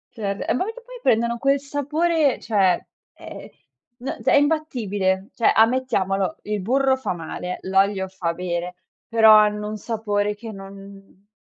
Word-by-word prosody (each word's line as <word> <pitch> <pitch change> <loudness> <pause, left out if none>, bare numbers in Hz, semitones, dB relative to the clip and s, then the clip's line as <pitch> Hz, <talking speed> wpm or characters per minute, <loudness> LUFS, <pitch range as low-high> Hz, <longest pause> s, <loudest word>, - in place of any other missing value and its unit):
Cer 200 -3 -3
eh, - - +2
ma 255 - 0
perché 450 +4 -7
poi - - -11
prendono 235 - +2
quel 275 +3 +2
sapore, 290 +1 0
cioè, 195 -5 +1 0.3
ehm, - - -10 0.5
n 260 - -5
è - - +3
imbattibile, 215 -11 0
cioè, 230 - +2
ammettiamolo, 220 -5 +1
il 210 -1 -3
burro 265 +6 +2
fa 250 -8 -3
male, 175 +2 -5
l'olio 195 0 +1
fa 180 -3 -3
bene, 175 0 -4 0.3
però 220 -1 +6
hanno 210 0 +3
un 215 0 -5
sapore 210 -2 -2
che 220 +2 -9
non 195 0 -13
210 Hz, 145 wpm, -22 LUFS, 195-260 Hz, 0.5 s, però